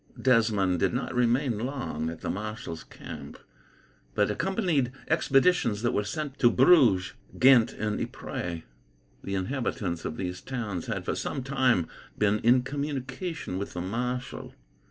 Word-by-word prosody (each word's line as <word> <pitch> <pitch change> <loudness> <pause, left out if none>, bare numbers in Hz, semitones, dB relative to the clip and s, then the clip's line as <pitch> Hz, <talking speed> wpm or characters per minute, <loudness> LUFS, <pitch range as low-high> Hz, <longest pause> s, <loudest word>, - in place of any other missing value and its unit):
Desmond 110 -8 +3
did 120 - +1
not 125 - -2
remain 125 -1 +2
long 125 - -3
at 85 - -8
the - - -3
marshal's 105 -5 -5
camp, - - -9 0.8
but - - +2
accompanied 170 - 0 0.2
expeditions 135 - +3
that 120 - +2
were 105 - 0
sent 140 +6 -4
to 120 - +6
Bruges, 125 - +5 0.2
Ghent, 125 -3 +6
and 105 0 -2
Ypres. 85 -2 -5 0.6
The 100 - -3
inhabitants 95 -4 -2
of 80 - -4
these 90 -1 -4
towns 110 -10 -4
had, - - -3
for - - 0
some 135 - -3
time, 130 - +2 0.3
been 105 0 +2
in 125 +3 +4
communication 140 - -4
with 100 - -5
the 90 - -3
marshal. 125 +6 -4
120 Hz, 140 wpm, -28 LUFS, 100-135 Hz, 0.8 s, to